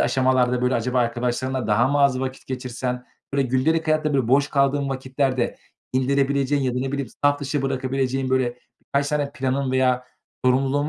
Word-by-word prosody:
aşamalarda 130 -1 +2
böyle 125 0 +2
acaba 125 +2 0
arkadaşlarınla 125 +1 -1
daha 115 +4 +3
mı 145 +1 +1
az 135 -2 +3
vakit 130 0 -5
geçirsen? 125 -1 -4 0.3
Böyle, 140 - +3
gündelik 160 +6 +1
hayatta, 155 -1 +1
böyle, 130 -4 +1
boş 140 +3 +4
kaldığın 140 0 +1
vakitlerde 130 -1 -1 0.4
indirebileceğin 140 +1 +1
ya 125 -1 0
da, - - 0
ne 135 +1 -2
bileyim, 140 -4 -2 0.2
saf 145 0 +3
dışı 140 0 -2
bırakabileceğin, 130 0 -1
böyle, 125 -2 +1 0.2
birkaç 140 +1 -1
tane 145 -2 -1
planın 135 -1 -1
veya 130 -1 +2 0.4
sorumluluğun 135 +3 +2
130 Hz, 165 wpm, -23 LUFS, 125-140 Hz, 0.4 s, boş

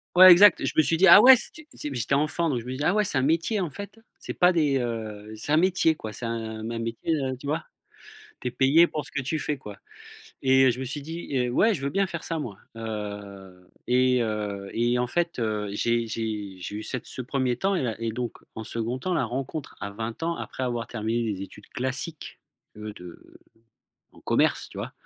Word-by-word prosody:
Ouais, 185 0 +11
exact, 195 +2 +7
je - - -1
me 155 - +6
suis 165 +2 +1
dit: 190 +3 +5
«Ah 205 +5 +10
ouais». 260 +1 +10
C'était 305 +5 -6
c'était 145 -2 -4
j'étais 120 +4 0
enfant 155 +3 +1
donc 125 -5 0
je 115 - -14
me 125 - -5
disais: 130 +3 -4
«Ah 175 - +3
ouais, 210 - +3
c'est 155 - 0
un - - +1
métier 165 - +1
en 175 - -1
fait, 200 +7 -9 0.2
c'est - - -6
pas 180 +1 +4
des 150 -5 +2
heu 110 -3 -5
c'est 110 +7 -5
un 155 - +5
métier 175 -2 +3
quoi, 110 -7 -7
c'est 120 - -6
un 110 -1 -4
mmh, 115 - -4
un 115 - -3
métier», 115 +8 -2
heu 130 -3 -2
tu 140 - -12
vois? 155 +3 -1 0.8
Tu 125 - -2
es - - -11
payé 140 +7 +5
pour 150 - -4
ce - - -11
que 140 - -2
tu 155 +4 -2
fais 150 -2 -2
quoi 105 -5 -10 0.7
et 130 0 +5
heu, 130 - +6
je 125 - -4
me 130 - -3
suis 145 +3 -5
dit: 160 -1 -5
«Heu, 125 -1 +1
ouais, 215 - +3
je 140 - -6
veux 140 - -1
bien 195 0 +1
faire 170 -3 -6
ça 165 - -2
moi». 115 -10 -6 0.2
Heu, 100 -4 -7 0.2
et 125 0 +3
heu 105 -3 -3
et 120 +1 +1
en 125 - +1
fait 170 +4 -1
heu, 105 -3 -1
j'ai 115 +2 0
j'ai 105 -3 -4
j'ai 105 +3 -6
eu 110 - -5
cette 125 - -5
ce - - -6
1er 130 -1 -1
temps 195 +7 +1
et - - -1
là 115 -3 -1
et 115 -1 -1
donc 120 0 -4 0.2
en 110 - -6
2d 115 +3 -3
temps, 185 +7 -3
la 165 - +1
rencontre 135 +4 -5
à 100 - -4
20 115 +6 -6
ans 170 +1 0
après 130 - -6
avoir 120 -2 -2
terminé 115 0 -2
des 95 -2 -4
études 100 - -11
classiques 135 +5 -5 0.3
de 105 0 -7
de 90 -4 -13 0.7
en - - -19
commerce - - +1
tu - - -11
vois? - - -5
125 Hz, 240 wpm, -26 LUFS, 110-155 Hz, 0.8 s, Ouais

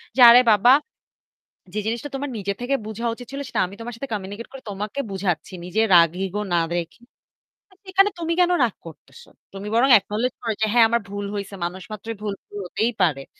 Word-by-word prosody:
যে 260 - +2
আরে 245 +1 +8
বাবা 240 +6 +6 1.0
যে 215 - 0
জিনিসটা 235 +6 -3
তোমার 280 +1 -3
নিজের 200 0 -3
থেকে 255 +3 0
বুঝা 225 +2 -5
উচিত 245 +1 -10
ছিল 280 +1 -5
সেটা - - -2
আমি 195 - -11
তোমার 240 +1 -6
সাথে 275 +1 -6
communicate 205 +3 -6
করে 270 - -9
তোমাকে 210 +7 -5
বুঝাচ্ছি। 185 -3 -2
নিজের 220 +5 +1
রাগ 170 -1 +7 0.2
ego 205 +2 -3
না 170 - +4
দেখে। 170 +4 -4 0.9
এখানে 390 +1 +5
তুমি 335 0 -1
কেন 360 0 +4
রাগ 230 - +1
করতেসো? 140 -4 -14 0.2
তুমি 195 +2 -7
বরং 255 +4 +4
acknowledge 215 +5 -3
করো 225 -2 -1
যে, 220 - +4
"হ্যাঁ 235 -2 +7
আমার 235 0 +1
ভুল 205 0 -4
হইছে।" 200 0 -5
মানুষ 185 +2 -6
মাত্রই 220 +2 -6
ভুল 205 -2 -2
ভুল 205 - -11
হতেই 225 +6 -1
পারে। 140 -6 0
215 Hz, 195 wpm, -23 LUFS, 195-245 Hz, 1.0 s, আরে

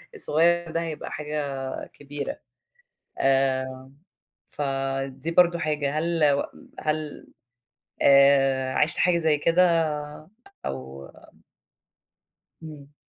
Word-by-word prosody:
الصغيّر 170 - +2
ده 165 0 -1
هيبقى 160 -2 -5
حاجة 150 0 -3
آآ، 135 -1 -5
كبيرة، 145 0 -6 0.8
آآ، 130 -1 0 0.6
فدي 135 +1 -3
برضه 170 0 +4
حاجة، 150 -1 -1
هل 165 -2 +2
و 140 - 0 0.4
هل 155 -1 -3 0.8
آآ، 135 -1 +5
عِشت 150 +1 +2
حاجة 175 -1 +3
زي 160 -3 +2
كده 165 +1 +3 0.8
أو 65 +1 -6
آآ - - -18 1.3
إمم. 150 -2 -11
145 Hz, 95 wpm, -25 LUFS, 135-160 Hz, 1.3 s, آآ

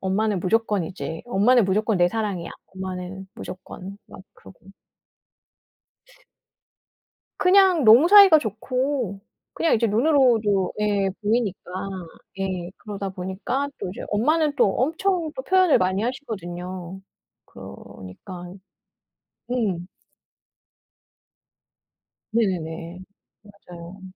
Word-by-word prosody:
"엄마는 195 +1 0
무조건이지 190 -5 -1
엄마는 240 +1 +4
무조건 210 +2 +1
내 175 0 +4
사랑이야 200 -5 -3 0.2
엄마는 190 0 -6
무조건." 190 +1 -9
막 - - -12
그러고. 190 - -18 2.7
그냥 370 -4 +5
너무 235 +9 +8
사이가 390 -5 +8
좋고 250 -2 -2 0.3
그냥 330 - +1
이제 230 0 +1
눈으로도 225 -5 +2
예 205 -2 +1
보이니까 210 -4 -1 0.7
예 185 -2 -3
그러다 200 -2 -6
보니까 190 +10 -3
또 - - -4
이제 185 - -8
엄마는 300 +8 +1
또 205 - +4
엄청 330 +4 0
또 - - -4
표현을 370 -2 +4
많이 185 +2 0
하시거든요. 185 -7 -6 0.5
그러니까 175 - -11 1.0
음. 195 -8 -1 2.4
네네네. 175 -5 -2 0.4
맞아요. 185 -2 -13
205 Hz, 220 characters per minute, -23 LUFS, 185-250 Hz, 2.7 s, 너무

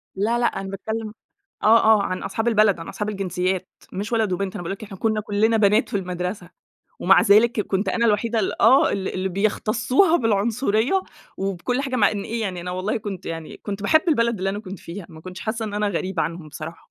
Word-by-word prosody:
لأ 225 +5 0
لأ، 240 - +2 0.2
أنا 195 - -6
باتكلَّم 215 +2 -5 0.5
آه، 225 +2 +5
آه، 220 -2 +5
عن 185 -1 -3
أصحاب 220 +4 -2
البلد، 215 -5 +4
عن 165 - -8
أصحاب 210 - -4
الجنسيات، 185 -2 -2 0.2
مش 205 +5 -4
ولد 220 -4 +1
وبنت، 190 +1 -2
أنا - - -5
باقول 170 - -4
لك 195 - -8
إحنا 200 -2 -10
كنّا 220 +1 0
كلنا 215 +2 +1
بنات 210 +2 +3
في - - -2
المدرسة، 180 0 -4 0.5
ومع 190 +2 +6
ذلك 215 +2 +4
كنت 195 0 -1
أنا 235 0 +1
الوحيدة 225 +2 +1
ال 195 - -2
آه، 270 +7 +5
ال 190 -1 -2
اللي 190 +1 -1
بيختصُّوها 215 - +2
بالعنصرية 225 - +1 0.3
وبكل 195 +6 -2
حاجة، 265 -2 -2
مع 210 -4 +4
إن 205 -2 -3
إيه 230 +1 -3
يعني 185 -4 -3
أنا 180 - -5
والله 185 +3 -2
كنت 200 -4 -6
يعني 165 -1 -6
كنت 200 -1 -5
باحِب 315 +10 +4
البلد 235 - +2
اللي 195 +1 -1
أنا 200 - -4
كنت 190 -2 -8
فيها، 170 +2 -8
ما 160 -2 -13
كنتش 185 +2 -9
حاسّة 225 +1 -3
إن 210 -1 -5
أنا 210 0 0
غريبة 185 -2 -2
عنهُم 165 -2 -5
بصراحة. 155 +3 -9
205 Hz, 215 wpm, -23 LUFS, 185-225 Hz, 0.5 s, ومع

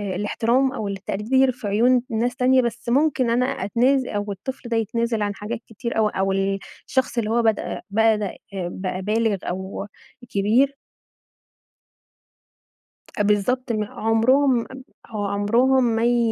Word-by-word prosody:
الاحترام 235 +6 +1
أو 215 -5 -4
التقدير 215 +7 +1
في 240 -4 -7
عيون 240 +4 +3
ناس 240 +2 -1
تانية، 255 0 +4
بس 235 0 -4
ممكن 265 -2 +2
أنا 245 +2 +2
أتناز 255 +4 +1
أو 205 -3 -3
الطفل 240 +5 -7
ده 230 - +1
يتنازل 230 0 -1
عن 205 -1 -1
حاجات 220 +3 -5
كتير 235 +1 -5
أوي 215 -1 +2
أو 195 0 +1
ال 195 0 0 0.3
الشخص 260 -2 0
اللي 215 -2 0
هو 235 +1 +2
بدأ 220 -2 0
-بدأ، 215 -1 +1 0.2
بقى 185 0 -4
بالغ 215 +1 +1
أو 190 +2 -5 0.4
كبير. 240 +8 +2 2.4
بالضبط 210 +5 +1
ما 215 -2 -1
عُمرهم 245 +4 +3
م - - -13 0.4
هو 215 -3 -4
عُمرهم 230 +7 +2
ما 230 -1 +1
ي 240 0 +3
225 Hz, 140 wpm, -23 LUFS, 205-250 Hz, 2.4 s, تانية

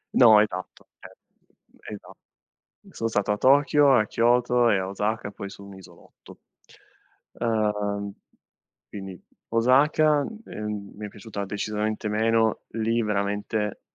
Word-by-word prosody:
No 110 -4 +7
esatto, 95 -3 -5
cioè - - -13 0.8
esat 100 - -11 0.8
sono 115 - -3
stato 105 -1 0
a - - -1
Tokyo, 145 +1 +4
a 110 - +3
Kyoto 120 +1 +2
e 100 - +3
a 95 - -2
Osaka, 105 +2 -3
poi 100 - -7
su 100 - -12
un 100 -1 -12
isolotto. 95 - -17 0.9
Uhm, 105 -3 -1 0.8
quindi 95 -3 -9 0.3
Osaka, 145 +5 +3 0.2
ehm, 105 -1 -6
mi 105 0 -6
è - - -7
piaciuta 100 0 -7
decisamente 105 +1 -3
meno, 110 +1 +1
lì 115 +1 0
veramente 105 0 -2
105 Hz, 120 wpm, -25 LUFS, 105-115 Hz, 0.9 s, No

